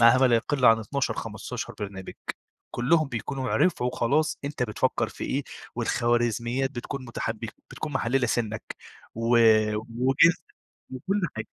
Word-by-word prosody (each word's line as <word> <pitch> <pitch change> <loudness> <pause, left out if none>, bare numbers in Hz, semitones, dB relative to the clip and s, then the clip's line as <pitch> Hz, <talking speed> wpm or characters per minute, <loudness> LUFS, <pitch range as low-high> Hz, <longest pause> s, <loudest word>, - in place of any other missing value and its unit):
معاها 115 +2 +7
ما 130 - +5
لا 120 -2 +4
يقل 130 +3 -1
عن 115 -1 +7
12 140 +5 -1
15 - - -5
برنامج، 100 -2 -6 0.6
كلّهم 155 +5 +2
بيكونوا 130 +2 -3
عرفوا 125 -9 +2
خلاص 150 +6 +1
أنت 140 -3 -2
بتفكّر 110 -3 0
في - - -7
إيه، - - -1 0.3
والخوارزميات 120 +2 0
بتكون 130 +1 -6
مُتحبك 115 -1 -4 0.2
بتكون 155 - -5
محللة 130 -1 +1
سِنك 110 -2 -1 0.5
و 115 +1 -3 0.6
وجنسك 135 +8 +3 0.5
وكُلّ 190 +11 -2 0.2
حاجة. 110 0 -4
120 Hz, 135 wpm, -26 LUFS, 115-135 Hz, 0.6 s, معاها